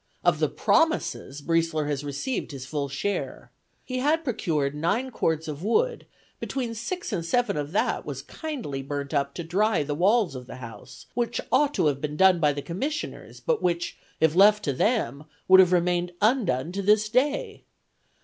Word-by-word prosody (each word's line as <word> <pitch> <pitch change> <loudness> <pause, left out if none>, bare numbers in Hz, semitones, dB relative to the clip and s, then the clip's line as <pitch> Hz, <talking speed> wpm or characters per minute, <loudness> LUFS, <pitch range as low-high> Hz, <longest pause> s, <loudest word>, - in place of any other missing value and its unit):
Of - - +3
the - - +2
promises 315 - 0
Briesler 165 -2 +1
has 145 -1 -2
received 145 - -3
his 135 -3 -7
full 140 0 -3
share. 195 +9 -3 0.3
He 255 0 -3
had 305 +5 +2
procured 155 - -1
nine 200 - -1
cords 160 -7 -1
of 150 0 -5
wood; 470 - +1 0.3
between 250 -4 -3
six 240 +6 -4
and 175 -4 -1
seven 240 +8 +1
of 145 0 -3
that - - +1
was - - -6
kindly 255 - -5
burnt 140 +1 -5
up 140 -1 0
to 170 - -4
dry 190 +1 +1
the 145 +1 -3
walls 190 - +3
of 125 -2 -8
the - - -8
house, 120 -3 -11
which 240 0 -1
ought 285 +3 +3
to - - +2
have 140 -2 +1
been 150 0 -3
done 190 -1 +5
by 150 -2 +3
the 145 0 -5
commissioners, 270 - -4
but 485 -2 0
which, 175 -1 -1 0.2
if 160 -1 +3
left 210 +3 +6
to 140 - 0
them, 150 - 0 0.2
would 190 0 +8
have 185 -1 +6
remained 175 0 +1
undone 200 - +1
to 200 +2 -3
this 210 +2 +3
day. 295 - 0
175 Hz, 180 wpm, -26 LUFS, 145-240 Hz, 0.3 s, would